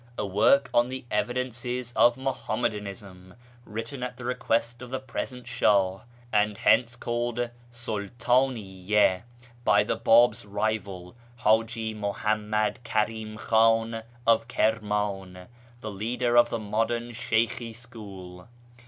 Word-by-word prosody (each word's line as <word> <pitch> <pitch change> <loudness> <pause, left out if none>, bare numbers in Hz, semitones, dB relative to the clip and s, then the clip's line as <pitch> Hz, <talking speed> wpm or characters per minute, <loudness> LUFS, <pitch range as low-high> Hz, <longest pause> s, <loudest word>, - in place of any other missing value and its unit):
A - - -1
work 105 +8 +4
on 120 +1 +3
the 130 0 -6
evidences 125 +1 -2
of 120 +1 +5
Muhammadanism, 105 -7 -4 0.3
written 115 +5 -6
at 125 0 -4
the 125 - -8
request 120 -1 -1
of 125 - -8
the 130 +1 -3
present 125 -1 -6
Sh;ih 95 -2 +2 0.3
(and 105 -1 +2
hence 120 -1 +3
called 120 0 -2 0.2
Sultdniyya) 110 -4 0 0.4
by 105 -3 +4
the 105 - -1
Bab's 115 +1 +4
rival, 100 -3 -3 0.2
Haji 115 -1 +1
Muhammad 105 +2 -1
Karim 110 -1 -2
Khan 115 0 +2 0.2
of 115 0 +3
Kirman, 105 -5 -1 0.4
the 110 - -5
leader 120 +4 -1
of 120 0 +6
the - - -1
modern 115 +3 -1
Sheykhi 115 0 -1
school. 100 -7 -11
115 Hz, 115 wpm, -27 LUFS, 105-120 Hz, 0.4 s, of